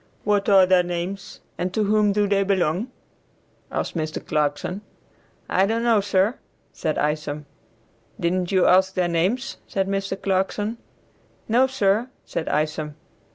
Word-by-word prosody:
"What 205 -1 +1
are 195 -2 +7
their 185 -1 +5
names, 180 +3 -5 0.2
and 180 +1 -1
to 215 - +2
whom 210 0 +3
do 205 0 +2
they 200 0 +2
belong?" 190 +2 0 0.8
asked - - -3
Mr. 155 -1 -3
Clarkson. 150 +6 -1 0.7
"I 190 +1 +2
don't 225 +2 0
know, 230 -3 +4
sir," 200 +3 +1 0.3
said - - -2
Isom. 150 0 -2 0.7
"Didn't 180 +1 0
you 185 -2 +4
ask 190 +1 +4
their 180 -2 +1
names?" 190 +11 0
said 195 -1 -1
Mr. 195 0 -2
Clarkson. 205 +4 -1 0.7
"No, 245 +4 +4
sir," 225 -2 +1 0.2
said 160 - -3
Isom. 150 0 -1
190 Hz, 140 wpm, -23 LUFS, 175-205 Hz, 0.8 s, are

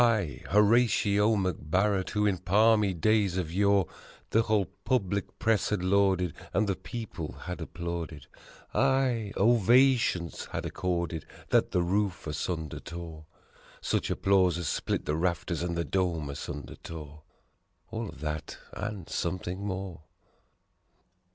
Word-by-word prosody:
I, 105 - +1
Horatio 105 0 +4
MacBarret, 95 +1 0
who 105 0 +1
in 95 -3 +1
palmy 105 +3 +4
days 100 +1 +2
of 85 -3 -2
yore, 100 0 +3 0.5
The 115 - +5
whole 110 -3 +2 0.2
public 100 -6 -1
press 110 -3 +2
had 105 -4 -1
lauded 95 -3 +2 0.2
and 105 - +3
the 95 - +1
people 95 -4 -6
had 90 -1 -5
applauded 85 -2 -5 0.5
Aye, 125 -6 +2
ovations 120 -4 +3
had - - -5
accorded 85 -3 -2 0.2
that - - +3
the 90 - +1
roof 95 +1 0
asunder 80 0 -3
tore 85 -2 -8 0.5
Such - - -1
applause 95 -3 +3
as 90 -3 -3
split - - -1
the 75 - 0
rafters 85 0 -1
and 85 -1 -2
the 85 - 0
dome 85 -6 -1
asunder 70 -2 -7
tore: 75 -2 -9 0.7
All 115 -1 -3
of 70 - -12
that 75 0 -4 0.2
and 105 -5 -5
something 95 +1 -3
more. 95 -4 -4
95 Hz, 130 wpm, -29 LUFS, 85-105 Hz, 0.7 s, The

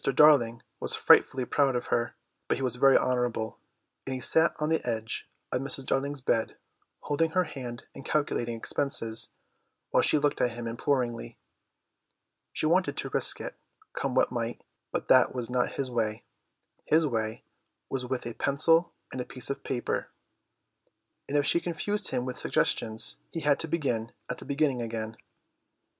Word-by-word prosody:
Darling 120 -7 +5 0.2
was - - 0
frightfully 130 -1 +4
proud 135 0 +2
of 120 - -2
her, 120 0 0 0.3
but - - +1
he 135 - -4
was 125 -1 -1
very 135 +1 +6
honourable, 120 -3 -1 0.5
and 130 - -2
he - - -4
sat 160 +5 +4
on 150 0 -1
the 160 - +1
edge 115 -1 -3 0.2
of 125 - 0
Mrs. 135 0 -1
Darling's 140 +1 -1
bed, 115 -3 0 0.4
holding 155 +3 0
her 185 +3 +2
hand 125 -7 -7
and - - -10
calculating 120 -6 -1
expenses, 115 -2 0 0.6
while - - +4
she - - +4
looked 145 0 0
at 120 - +1
him 120 0 -6
imploringly. 120 - -1 1.1
She - - -2
wanted 180 +4 +2
to - - -2
risk - - +5
it, - - -5 0.4
come 135 -2 -2
what 130 - +3
might, 120 -1 -3 0.3
but - - -3
that 130 -1 +5
was 120 -1 -3
not 125 0 0
his 135 -2 -3
way; 110 -3 -1 0.6
his 160 +1 +4
way 110 -5 -2 0.4
was 135 -1 -3
with 125 0 -3
a 120 - -4
pencil 165 +7 +2 0.2
and 130 - -4
a - - -2
piece 125 +1 -3
of 140 - -5
paper, 125 -2 -2 1.2
and 145 - +1
if 145 - +2
she 170 - +3
confused 185 +5 -1
him 125 - -1
with 125 -1 -5
suggestions 110 0 0
he 165 - -4
had 145 -1 +2
to 165 - -2
begin 125 -9 -1 0.2
at - - -5
the - - -10
beginning 140 -3 0
again. 110 -1 -4
130 Hz, 170 wpm, -28 LUFS, 120-145 Hz, 1.2 s, very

